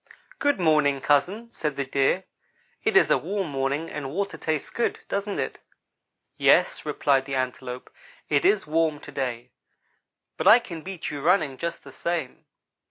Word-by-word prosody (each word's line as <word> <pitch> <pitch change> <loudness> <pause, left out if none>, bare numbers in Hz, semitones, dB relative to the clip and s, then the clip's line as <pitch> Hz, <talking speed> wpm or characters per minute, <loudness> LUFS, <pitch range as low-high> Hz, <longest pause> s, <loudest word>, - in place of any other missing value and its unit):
"'Good 285 -7 +2
morning, 150 -4 +3
cousin,' 185 - +1
said 150 -3 -3
the 140 - -2
Deer. 135 +7 +1 0.6
'It - - +3
is - - +5
a - - +4
warm 190 -2 -3
morning 140 +4 -1
and 145 -4 -5
water 195 +7 -2
tastes 155 -2 -2
good, 235 - -1
doesn't 200 0 -2
it?' - - -3 0.8
"'Yes,' - - +3
replied 135 -2 +2
the 135 -1 -3
Antelope, 125 -1 -4 0.3
'it 145 -2 +2
is 205 -1 +3
warm 155 -1 +1
to 145 - -11
day, 125 -3 -4 0.9
but - - -1
I 225 - +10
can 170 -9 -7
beat 185 0 -6
you 145 -1 -5
running, 150 -5 +2
just 170 +4 -4
the - - -12
same.' 170 -7 -3
150 Hz, 165 wpm, -25 LUFS, 135-185 Hz, 0.9 s, I